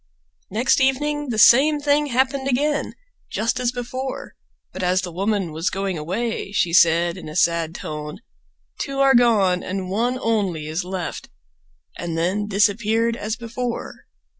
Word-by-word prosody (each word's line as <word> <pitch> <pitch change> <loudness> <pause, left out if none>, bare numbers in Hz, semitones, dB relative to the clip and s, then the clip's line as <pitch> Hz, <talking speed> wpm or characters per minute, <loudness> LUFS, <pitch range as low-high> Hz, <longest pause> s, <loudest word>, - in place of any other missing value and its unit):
Next 240 +6 +2
evening 295 +2 0
the 225 - -2
same 280 +8 +6
thing 290 +1 +2
happened 265 +1 0
again, 290 +3 0 0.3
just 230 +3 -1
as 245 -1 0
before, 255 +2 -5 0.4
but 190 - -6
as 185 +1 +1
the 180 - -5
woman 195 0 -1
was 160 +3 -1
going 195 -1 -3
away 195 +8 -3
she 175 -4 0
said 170 0 +4
in 170 - -8
a 155 - -9
sad 170 -1 +1
tone, 150 0 -6 0.6
"Two 275 -1 -3
are 275 0 +5
gone 210 -7 +4
and 185 0 -4
one 240 +5 0
only 200 -10 -1
is 160 +4 -3
left," 180 -1 -5 0.7
and 170 -1 -4
then 190 +5 0
disappeared 215 +3 +1
as 215 -1 -3
before. 240 0 -5
215 Hz, 150 wpm, -22 LUFS, 180-250 Hz, 0.7 s, same